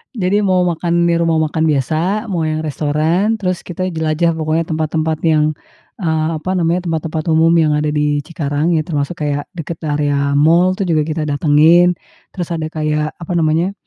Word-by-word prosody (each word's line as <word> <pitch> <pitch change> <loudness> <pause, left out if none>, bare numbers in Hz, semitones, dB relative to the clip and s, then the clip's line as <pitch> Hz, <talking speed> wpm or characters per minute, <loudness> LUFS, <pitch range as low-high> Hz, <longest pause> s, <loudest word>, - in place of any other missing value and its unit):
Jadi, 205 0 +1
mau 185 -2 +2
makan 170 0 0
di 170 - +2
rumah 165 -1 +1
makan 160 +1 -2
biasa, 160 - 0
mau 175 -5 -2
yang 155 0 -1
restoran, 160 +9 0
terus 180 -3 -2
kita 185 +1 -4
jelajah 160 +1 0
pokoknya 160 +1 0
tempat-tempat 155 0 -1
yang, 155 -2 +3 0.5
eee, 160 -4 0
apa 160 +4 -4
namanya 170 +1 0
tempat-tempat 160 0 -2
umum 160 +1 +4
yang 160 -2 +3
ada 150 0 0
di 150 0 +1
Cikarang, 155 +1 -1
ya 155 - +1
termasuk 150 0 -3
kayak 145 -1 -2
dekat 165 -1 -6
area 145 -1 0
mall 170 +5 +4
tuh 195 - -2
juga 155 -3 +2
kita 155 0 -2
datangin, 155 +4 +4 0.4
terus 175 -3 -3
ada 160 -2 -2
kayak 155 -1 -2
apa 170 0 -8
namanya, 165 +4 +1
160 Hz, 175 wpm, -17 LUFS, 150-170 Hz, 0.5 s, umum